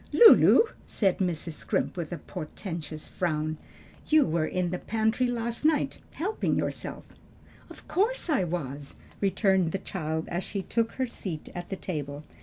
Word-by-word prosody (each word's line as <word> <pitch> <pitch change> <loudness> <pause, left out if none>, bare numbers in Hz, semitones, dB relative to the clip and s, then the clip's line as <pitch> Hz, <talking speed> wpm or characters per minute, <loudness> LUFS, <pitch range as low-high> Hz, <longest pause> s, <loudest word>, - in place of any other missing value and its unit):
"Lulu," 460 -1 +9 0.3
said 195 -4 +1
Mrs. 175 -3 -1
Scrimp 155 - -1
with 170 -3 -4
a 175 - -3
portentous 155 0 -6
frown, 155 -3 -1 0.5
"you 310 -2 +5
were 155 0 0
in 180 -1 -1
the 180 - -2
pantry 220 +3 +1
last 235 0 -2
night, 310 0 +2 0.2
helping 405 +7 0
yourself." - - -3 0.7
"Of - - -13
course 440 +5 +1
I 290 - +2
was," 145 -5 -4 0.2
returned 190 -3 +2
the - - +1
child 160 -5 -3
as 175 +2 -2
she 200 -2 -4
took 230 +3 0
her 260 - 0
seat 185 -9 -6
at 175 0 -6
the 195 - -2
table. 150 -6 -5
180 Hz, 155 wpm, -28 LUFS, 160-230 Hz, 0.7 s, Lulu